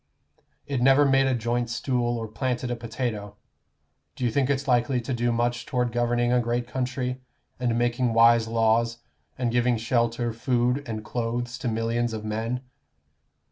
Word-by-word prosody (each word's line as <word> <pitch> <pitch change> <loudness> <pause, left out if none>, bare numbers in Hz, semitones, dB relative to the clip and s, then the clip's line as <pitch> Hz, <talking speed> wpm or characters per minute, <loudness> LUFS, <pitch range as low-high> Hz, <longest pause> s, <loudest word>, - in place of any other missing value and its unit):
It 140 -4 -2
never 135 +3 +6
made 135 -1 +4
a 130 - +2
joint 120 +1 -1
stool 120 0 -1
or 115 -1 -4
planted 125 +3 -2
a - - 0
potato. 115 -3 -4 0.8
Do 125 - -2
you 120 - +1
think 135 +2 +1
it's 140 0 0
likely 125 0 +2
to 120 +2 -4
do 120 0 +1
much 120 +1 -1
toward 125 -2 0
governing 120 0 +1
a 125 - +4
great 120 0 -1
country, 125 0 -3 0.4
and 120 -2 0
making 120 0 +1
wise 115 0 +6
laws, 115 +1 +2 0.4
and 125 -2 0
giving 120 0 +2
shelter, 115 0 0
food, 125 +3 +1
and 110 -2 -5
clothes 120 +1 -3
to - - -3
millions 115 +1 0
of 110 -1 -5
men? 115 +4 -2
120 Hz, 165 wpm, -26 LUFS, 115-125 Hz, 0.8 s, never